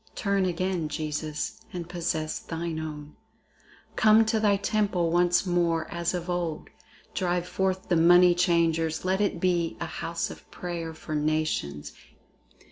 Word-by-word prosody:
Turn 200 -3 +1
again, 180 -2 -1
Jesus, 155 0 -4
and 175 -2 -5
possess 165 -3 -2
thine 165 -1 -4
own! 150 -1 -7 0.8
Come 220 +1 +6
to 220 0 +1
thy 205 -2 +3
temple 200 -5 0
once 175 +2 +3
more 170 -3 +1
as 170 +1 -1
of 175 0 -4
old! 175 -3 -3 0.4
Drive 180 -1 -1
forth 190 0 -1
the 175 - +2
money 175 +2 +7
changers, 165 -2 +1
let 190 +2 +1
it 200 -4 0
be 175 -2 0
A - - -2
house 170 0 -3
of - - -13
prayer 170 -2 -5
for 155 - -7
nations. 150 - -1
175 Hz, 140 wpm, -27 LUFS, 160-185 Hz, 0.8 s, money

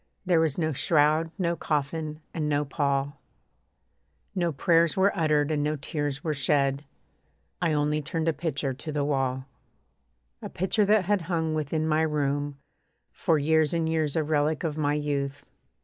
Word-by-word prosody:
There 175 -3 +3
was 160 -4 +1
no 160 -3 0
shroud, 155 +3 +2
no 170 -3 0
coffin, 155 0 -2
and 155 -2 -1
no 145 0 +1
pall, 140 -1 -1 1.1
No 175 -3 0
prayers 165 +3 +2
were 195 +2 +3
uttered 155 -3 +2
and 150 -1 0
no 150 +1 0
tears 145 -1 -4
were 155 - 0
shed 140 0 +1 0.8
I 165 -3 +2
only 150 +1 +1
turned 160 +2 -3
a 165 - +3
picture 150 -4 -2
to 155 +4 -7
the 145 -1 -1
wall. 130 -2 -1 1.0
A - - -6
picture 195 +4 +1
that 210 -2 +3
had 205 0 +1
hung 160 -3 0
within 155 +1 -1
my 155 0 +2
room 145 -2 -1 0.5
For 160 - +1
years 155 +2 +2
and 165 -1 0
years; 160 -3 0
a 160 - +2
relic 150 0 0
of 155 -3 -1
my 145 -1 0
youth. 145 -1 -2
150 Hz, 165 wpm, -27 LUFS, 145-160 Hz, 1.1 s, There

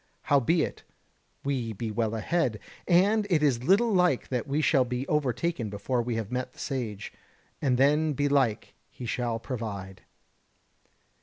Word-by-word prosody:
Howbeit, 145 +4 +2 0.6
we 125 -5 -2
be 110 +2 -4
well 110 +1 -1
ahead, 125 0 0 0.3
and 200 +4 +4
it 160 -5 +2
is 125 -5 +2
little 205 - +4
like 180 -8 +2
that 125 +1 -2
we 140 +2 0
shall 150 -4 +4
be 125 +1 -3
overtaken 140 -3 0
before 105 +5 -1
we 120 0 -2
have 110 -1 -4
met 125 0 -3
the - - -18
Sage; 115 -7 -4 0.5
and 130 -4 +2
then 150 +3 +3
belike 140 -5 +1 0.2
he 125 - -9
shall 120 0 -1
provide." 105 -6 -6
130 Hz, 145 wpm, -28 LUFS, 115-150 Hz, 0.6 s, and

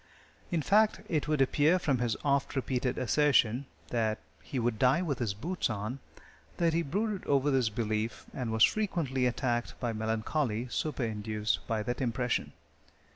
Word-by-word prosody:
In 170 -4 0
fact, 210 +1 +3
it 150 -3 0
would 150 -2 +1
appear 145 +6 +4
from 145 -8 0
his 120 -3 0
oft 140 0 +1
repeated 130 -1 -1
assertion, 130 -1 +3 0.2
that 110 -2 0 0.2
"he 135 - -6
would 120 -2 0
die 135 +7 +4
with 145 -7 -2
his 110 -5 -1
boots 165 - -2
on," 110 +5 -3 0.6
that 170 -2 +2
he 165 - +2
brooded 200 +6 -2
over 140 0 +3
this 130 -4 +2
belief 110 0 -2
and 125 -4 -3
was 110 0 +4
frequently 155 -12 +2
attacked 120 -1 -1
by 120 -2 -1
melancholy 110 +2 -1
superinduced 110 -7 -1
by 110 -2 -1
that 120 +4 -3
impression. 125 0 -1
125 Hz, 155 wpm, -30 LUFS, 115-150 Hz, 0.6 s, appear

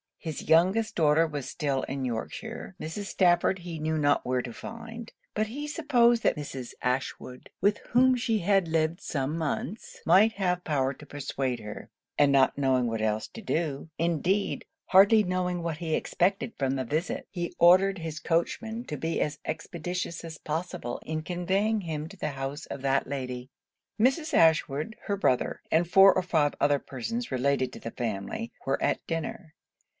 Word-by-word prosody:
His 160 -3 -6
youngest 190 +7 +4
daughter 155 0 +4
was 145 -4 -5
still 140 -5 -1
in 135 0 -3
Yorkshire; 180 - -5
Mrs. 165 +6 -5
Stafford 180 -1 +3
he 170 -2 -6
knew 155 +1 -1
not 145 -1 +2
where 125 0 +1
to 120 -1 -7
find; 230 - -8 0.2
but 215 +1 0
he 285 +7 -5
supposed 245 -7 +3
that - - +3
Mrs. 135 -4 -6
Ashwood, 125 0 -3
with 205 +2 +2
whom 255 +1 +5
she 230 -3 0
had 195 -1 +2
lived 160 +2 0
some 140 +1 -2
months, 165 - -4
might 200 +7 +6
have 180 -3 0
power 140 -4 0
to 150 - -13
persuade 135 -3 -3
her; 105 -1 -8 0.3
and 145 -1 +5
not 135 -1 +4
knowing 130 -3 +2
what 115 -1 -2
else 110 0 0
to 225 - -10
do, 160 -6 -2
indeed 170 +4 0 0.2
hardly 200 +3 +7
knowing 180 -1 -1
what 165 -2 -3
he 160 -1 -3
expected 195 +5 0
from 135 -1 0
the 130 -1 -2
visit, 155 +8 -2
he 175 -3 -4
ordered 185 +3 +6
his 160 -2 -5
coachman 220 +8 -1
to 150 - -5
be 160 +4 -2
as 150 -1 -1
expeditious 170 +2 -4
as 160 -2 -8
possible 160 -5 -4
in 155 0 -3
conveying 190 +5 0
him 155 -3 -4
to 200 - -13
the 150 - -2
house 135 +2 -5
of 140 - -6
that 135 0 +1
lady. 130 -2 -5 0.5
Mrs. 270 +7 +2
Ashwood, 160 +3 +3
her 200 -1 -1
brother, 130 -10 +1
and 165 +2 +3
four 195 +2 +7
or 185 - 0
five 155 -5 +1
other 145 -1 +3
persons 230 - -5
related 130 0 +1
to - - -8
the 115 - -6
family, 115 - -4
were 135 - 0
at - - 0
dinner. 165 0 -4
165 Hz, 170 wpm, -28 LUFS, 140-195 Hz, 0.5 s, hardly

